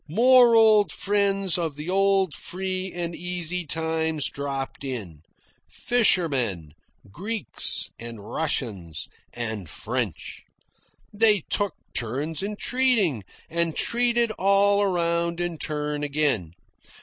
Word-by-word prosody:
More 245 +5 +6
old 215 -2 +5
friends 195 -2 0
of 160 -4 -2
the 150 +2 -7
old 195 -2 +2
free 185 0 -4
and 170 -1 -3
easy 180 -1 -4
times 160 -1 0
dropped 140 -1 -5
in, 105 - -6 0.5
fishermen, 135 - +1 0.4
Greeks, 205 - -1
and 115 -1 -8
Russians, 100 - -3 0.2
and 110 -7 -5
French. - - -4 0.7
They 210 -2 +5
took 205 -1 0 0.2
turns 135 +7 -2
in 205 +2 -3
treating, 220 - +1 0.2
and 170 -1 -1
treated 235 -1 +2
all 200 +1 +4
around 170 -3 0
in 175 -2 -2
turn 150 -1 -3
again. 140 - 0
170 Hz, 105 wpm, -25 LUFS, 140-200 Hz, 0.7 s, More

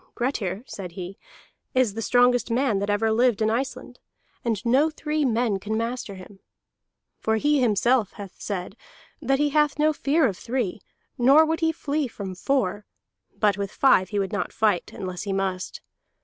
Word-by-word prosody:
"Grettir," 225 -6 -2
said 180 -8 -8
he, 185 +1 -7 0.6
"is 255 -5 +3
the 225 - -4
strongest 245 +2 +3
man 235 -3 +1
that 200 +1 -2
ever 215 +2 +2
lived 235 -1 +3
in 220 0 +2
Iceland, 260 +4 -4 0.4
and 230 -1 -2
no 270 +7 +4
three 305 0 -2
men 230 -4 +1
can 215 +3 -3
master 230 -3 -3
him. 190 +1 -13 0.8
For 220 - +1
he 290 +5 +2
himself 235 -1 +2
hath 200 -3 -10
said 195 -1 -4 0.5
that 270 -1 +2
he 295 +1 +2
hath 300 0 +2
no 305 +1 +3
fear 295 +1 +2
of 200 -7 -1
three, 230 -5 -2 0.4
nor 275 +6 +6
would 320 +1 -1
he 325 -1 +2
flee 300 -2 -2
from 200 -5 -7
four; 205 -1 -1 0.5
but 205 -2 +2
with 200 -1 -3
five 190 -9 +4
he 210 - -3
would 195 -2 -1
not - - -2
fight 210 -5 +1
unless 185 -2 -5
he 200 -2 -3
must. 190 -1 -3
225 Hz, 175 wpm, -25 LUFS, 200-270 Hz, 0.8 s, nor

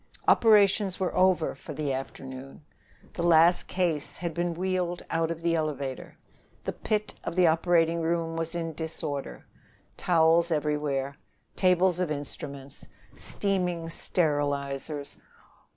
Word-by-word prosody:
Operations 205 -3 +4
were 185 - -1
over 185 -3 +3
for 150 - -9
the 145 -2 -1
afternoon. 135 +1 -7 0.5
The - - -4
last 170 +1 +5
case 170 -6 -1
had 170 -2 -4
been 175 +1 -1
wheeled 180 -1 -2
out 165 0 +1
of 165 0 -5
the 170 0 +2
elevator. 140 -4 -3 0.5
The - - -3
pit 215 -1 -2
of - - -4
the 185 -1 +5
operating 165 0 +3
room 165 0 -1
was 165 +1 -3
in 165 -1 -3
disorder 155 -3 -5 0.5
towels 165 0 +3
everywhere, 150 -3 -1 0.4
tables 180 -1 +3
of 180 -3 0
instruments, 140 -1 -7 0.3
steaming 180 -4 -1
sterilizers. 145 -3 -1
165 Hz, 120 wpm, -27 LUFS, 150-175 Hz, 0.5 s, last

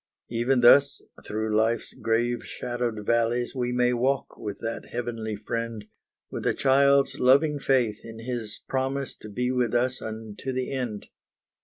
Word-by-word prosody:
Even 120 +2 +2
thus 140 +3 +6 0.3
through 110 0 -1
life's 110 +1 +1
grave 120 +1 0
shadowed 120 -4 -4
valleys, 115 +1 +1
We 125 -2 -1
may 125 0 +2
walk 130 +3 0
with 105 -2 -6
that 115 0 -4
Heavenly 115 -3 -4
Friend, 115 +1 -4 0.5
With - - -3
a - - +2
child's 140 +1 +3
loving 140 +4 +4
faith 125 -6 +1
in 115 -1 -9
His 115 -2 -5
promise 135 0 -2
To 105 - -10
be 125 +4 -1
with 125 -2 0
us 125 +1 +1
unto 110 +3 -6
the 130 0 -2
end. 125 -6 -3
120 Hz, 150 wpm, -26 LUFS, 115-130 Hz, 0.5 s, thus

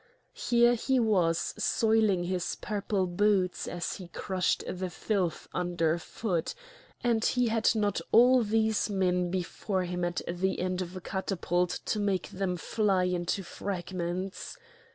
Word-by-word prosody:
Here 240 0 +3
he 260 +2 +1
was 180 -8 +2
soiling 220 -5 +2
his 180 0 -2
purple 200 -2 -1
boots 185 0 +1
as 175 -2 -3
he 185 - -9
crushed 185 +1 -1
the 185 0 -3
filth 180 -1 -2
under 170 -2 0
foot; 175 - -3 0.5
and 230 -2 +2
he 245 -1 +2
had 225 0 +2
not 205 -2 0
all 250 +2 +7
these 220 0 +1
men 180 -3 +1
before 185 +1 -2
him 180 0 -3
at 175 0 -1
the 180 +2 -1
end 185 0 -1
of 180 0 -6
a 185 - -6
catapult 180 -2 -1
to 215 - -1
make 200 -3 0
them 185 -1 -2
fly 195 0 +1
into 180 +1 -1
fragments! 185 - -4
185 Hz, 140 wpm, -29 LUFS, 180-215 Hz, 0.5 s, all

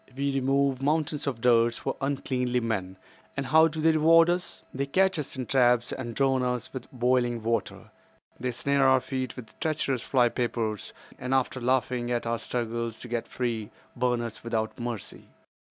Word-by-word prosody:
We 140 0 0
remove 135 0 +1
mountains 150 +1 0
of 125 -5 -2
dirt 120 -1 +4
for - - -3
uncleanly 130 -3 0
men, 95 -5 -3 0.4
and 140 - -1
how 160 +4 +6
do 160 0 -5
they 160 +1 +4
reward 165 +2 +5
us? 180 +1 -4
They 140 +1 -2
catch 185 +3 +2
us 145 - -5
in 130 -1 -4
traps 120 -2 +3
and 120 -3 -5
drown 135 -1 +2
us 125 -1 -2
with 130 -2 -7
boiling 120 -2 +1
water. 115 +1 -2 0.5
They 125 - -2
snare 135 +3 +2
our 130 0 +5
feet 130 -1 -4
with 115 -4 -11
treacherous 145 -5 0
fly 125 -3 +3
papers, 115 -4 -2 0.3
and 130 +1 -1
after 130 -1 0
laughing 125 -1 0
at 120 -1 -1
our 115 0 -1
struggles 115 -1 -3
to - - -7
get 120 -1 -2
free, 115 -4 -3 0.3
burn 125 -1 +1
us 115 -2 -6
without 115 +1 -2
mercy. 120 -4 -6
125 Hz, 175 wpm, -27 LUFS, 120-140 Hz, 0.5 s, how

